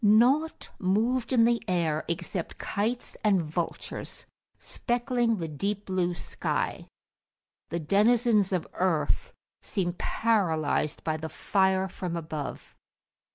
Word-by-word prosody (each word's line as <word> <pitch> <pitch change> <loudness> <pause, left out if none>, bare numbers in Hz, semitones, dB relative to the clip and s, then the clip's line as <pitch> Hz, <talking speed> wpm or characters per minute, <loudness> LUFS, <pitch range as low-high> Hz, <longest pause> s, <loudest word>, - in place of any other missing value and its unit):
Nought 250 +10 +4
moved 230 +7 +1
in 240 -3 +5
the 235 0 +3
air 165 -4 +1
except 170 0 -3
kites 230 +5 -2
and 205 -3 +4
vultures, 165 +1 -4 0.3
speckling 240 -1 0
the 165 -3 -3
deep 200 +7 -2
blue 180 -2 0
sky: - - -2 0.8
the 170 - -2
denizens 210 - +3
of 180 -3 0
earth 185 - 0 0.3
seemed 175 -3 -2
paralysed 160 -9 +1
by 155 -1 0
the 160 0 -5
fire 190 0 +2
from 180 -2 -4
above. 155 -3 -6
190 Hz, 110 wpm, -28 LUFS, 170-230 Hz, 0.8 s, in